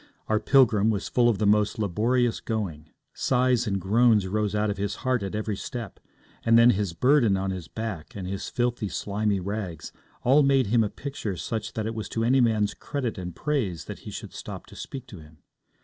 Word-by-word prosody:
Our 110 0 +2
pilgrim 110 -6 +4
was 105 -3 -1
full 120 -1 +3
of 110 - +1
the 105 - 0
most 105 0 +3
laborious 115 +4 +1
going; 85 -9 -4 0.2
sighs 125 -2 +2
and 100 -2 0
groans 110 +2 +3
rose 105 +2 -1
out 105 0 +1
of 100 - -5
his 100 +1 -2
heart 130 -3 +2
at 100 +1 -4
every 105 -1 -2
step; 115 0 -6 0.4
and 115 0 +5
then 115 +1 +7
his 100 -4 -1
burden 120 - +3
on 95 0 -1
his 90 -4 -6
back, 110 -8 -6
and 95 -3 -5
his 95 +1 -4
filthy, 120 -3 -1
slimy 105 0 -1
rags 95 -5 -5 0.3
all 135 +4 +5
made 135 -2 +4
him 115 +2 +3
a 105 - -1
picture 120 -9 -5
such 110 +4 -4
that 110 - -3
it 110 - -2
was 110 -2 -5
to 115 - -1
any 130 +3 +4
man's 110 -4 +2
credit 125 -8 -4
and 90 -2 -6
praise 125 - -2
that - - -7
he - - -9
should - - -8
stop - - -7
to - - -15
speak 130 -2 -7
to 105 -8 -11
him. 80 0 -16
110 Hz, 210 wpm, -26 LUFS, 100-120 Hz, 0.4 s, then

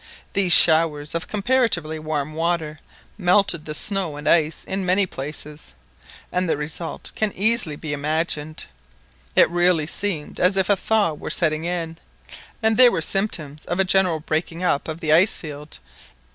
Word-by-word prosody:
These 195 -3 +1
showers 155 -3 +5
of 165 0 -3
comparatively 205 -8 0
warm 155 -1 -3
water 160 -2 -2 0.4
melted 180 -3 +2
the 150 - -4
snow 190 -4 -1
and 145 - -7
ice 160 -2 +2
in 190 0 -3
many 185 +2 +2
places, 150 - -8 0.6
and 180 -1 -1
the - - +1
result 160 +3 -5
can 215 -1 -1
easily 215 -6 +1
be 150 0 -5
imagined. 155 +1 -2 0.7
It - - +6
really 175 -2 +2
seemed 170 -2 -4
as 185 +2 +3
if 190 +1 +2
a - - +5
thaw 205 -3 +1
were 150 - -7
setting 155 -1 0
in, 170 -2 -3 0.7
and 220 0 +2
there 250 -1 +7
were - - -1
symptoms 160 -5 -2
of 175 +2 -3
a - - +5
general 185 -3 +2
breaking 165 +3 -3
up 145 -5 0
of 160 +1 -6
the 155 -2 +2
ice 180 +6 +4
field. 150 -1 -9
165 Hz, 160 wpm, -22 LUFS, 155-190 Hz, 0.7 s, there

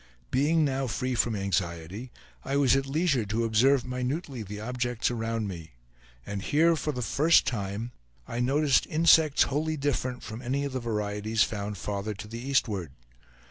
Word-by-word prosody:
Being 150 +4 +3
now 135 -1 -1
free 130 +2 -2
from 120 -2 +1
anxiety, 95 +3 -3 0.3
I 135 - -2
was 135 -3 +4
at 135 0 0
leisure 145 -3 +1
to 110 +3 0
observe 120 +4 +3
minutely 125 +1 -3
the 105 0 -7
objects 120 +1 -1
around 115 -2 -2
me; 85 -6 -8 0.5
and 100 -1 -4
here, 165 - +3
for 155 -1 -2
the 125 -3 -4
first 155 +9 +4
time, 110 -2 -3 0.4
I 115 - -4
noticed 140 +3 +2
insects 160 -2 +5
wholly 155 +3 -1
different 130 -3 -2
from 110 +2 -7
any 135 +3 -1
of 140 - -4
the 130 - -1
varieties 105 -1 0
found 105 -1 -4
farther 100 +2 -3
to 105 +2 -8
the 115 +2 -7
eastward. 110 - -1
120 Hz, 165 wpm, -28 LUFS, 105-140 Hz, 0.5 s, insects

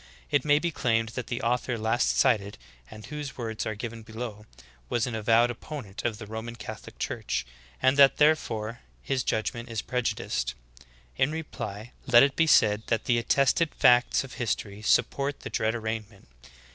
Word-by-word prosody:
It 145 -3 +3
may 145 -1 +4
be 170 +3 -1
claimed 115 -5 0
that 120 +1 -5
the 120 - -4
author 120 +1 0
last 110 +3 +1
cited, 100 -2 +2 0.3
and 110 0 -11
whose 150 -2 -6
words 115 -3 -3
are 110 - -3
given 115 +1 -6
below, 110 -1 -7 0.4
was 120 - +1
an 125 - -4
avowed 115 +2 +3
opponent 120 -5 -8
of 115 -3 -1
the 110 - -8
Ro 110 +2 -5
man 115 +1 -7
Catholic - - -9
Church, - - -2 0.4
and 130 +2 +4
that, 140 -1 +7
therefore, 120 -7 +1 0.2
his 135 -2 -1
judgment 115 +2 -2
is 115 -1 -3
prejudiced; 105 - -2 0.6
in 130 +3 +2
reply 120 -8 -6 0.2
let 120 -1 +8
it 140 0 +2
be 165 - +3
said 105 -7 +5
that 115 -2 0
the 120 -1 +3
attested 140 +6 +2
facts 125 +2 +4
of 135 - -10
history 105 -4 -3
support 140 +5 +1
the - - -7
dread 110 +1 0
arraignment. 110 - -5
115 Hz, 170 wpm, -27 LUFS, 110-130 Hz, 0.6 s, let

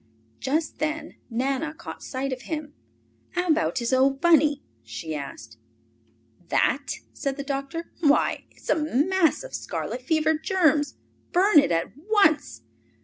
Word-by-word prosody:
Just 300 +3 -1
then 310 +2 -3
Nana 270 +6 -1
caught 340 - -9
sight 265 0 -3
of 255 - -6
him. 300 -1 -5 0.6
"How 360 -1 -1
about 315 -3 +2
his 235 0 0
old 270 +1 +3
Bunny?" 305 -4 +4 0.2
she 135 +8 -6
asked. 115 -6 -7 0.9
"That?" 280 +2 +1 0.2
said 275 0 -3
the 280 - -3
doctor. 275 +4 -4
"Why, 295 -3 +2
it's - - -5
a - - +4
mass 320 - +2
of - - -10
scarlet 250 - -4
fever 315 +3 +2
germs! 315 -2 +2 0.4
Burn 365 -2 +6
it 280 - +2
at 165 0 0
once. 310 - +2
295 Hz, 140 wpm, -25 LUFS, 265-320 Hz, 0.9 s, Burn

